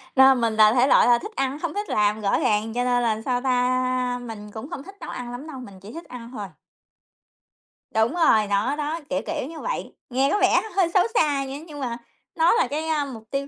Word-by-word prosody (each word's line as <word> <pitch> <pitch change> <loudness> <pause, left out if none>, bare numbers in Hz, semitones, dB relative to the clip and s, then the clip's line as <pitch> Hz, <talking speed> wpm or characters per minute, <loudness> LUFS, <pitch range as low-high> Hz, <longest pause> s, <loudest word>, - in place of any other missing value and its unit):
Nên 265 -2 +6
mình 230 -1 +1
là 215 0 +6
thể 255 +1 +4
loại - - +5
là 240 -1 +5
thích 425 - -8
ăn, 270 +2 -1
hông 340 0 -3
thích 410 +1 -4
làm, 210 +1 +1
rõ 200 -1 +1
ràng, 215 +1 0
cho 245 0 0
nên 245 -1 +2
là 220 -2 0
sao 245 +1 -1
ta, 255 -1 0
mình 210 -3 -8
cũng 225 +8 -8
không 285 -6 -6
thích 390 +3 -12
nấu - - -7
ăn 245 -1 -6
lắm 255 +6 -7
đâu, 270 -4 -8
mình 200 -7 -11
chỉ 205 +5 -12
thích 335 - -8
ăn 240 -1 -10
thôi. 210 -6 -6 1.4
Đúng 220 +5 +2
rồi, 265 -12 +4
nó 205 +7 +1
đó, 300 +2 -3
kiểu, 185 - -1
kiểu 260 - -3
như 325 -1 -9
vậy, - - -4 0.2
nghe 265 +2 +1
có 415 - +2
vẻ - - +4
hơi 375 -3 +3
xấu 370 - +5
xa 290 - +2
nhưng 280 +4 -7
nhưng 295 -3 -10
mà 240 -3 -3 0.4
nó 330 +1 +4
là 470 - +2
cái, 305 +2 -3
a, 305 -3 0
mục 240 -5 -9
tiêu 275 0 -2
255 Hz, 240 wpm, -24 LUFS, 225-295 Hz, 1.4 s, Nên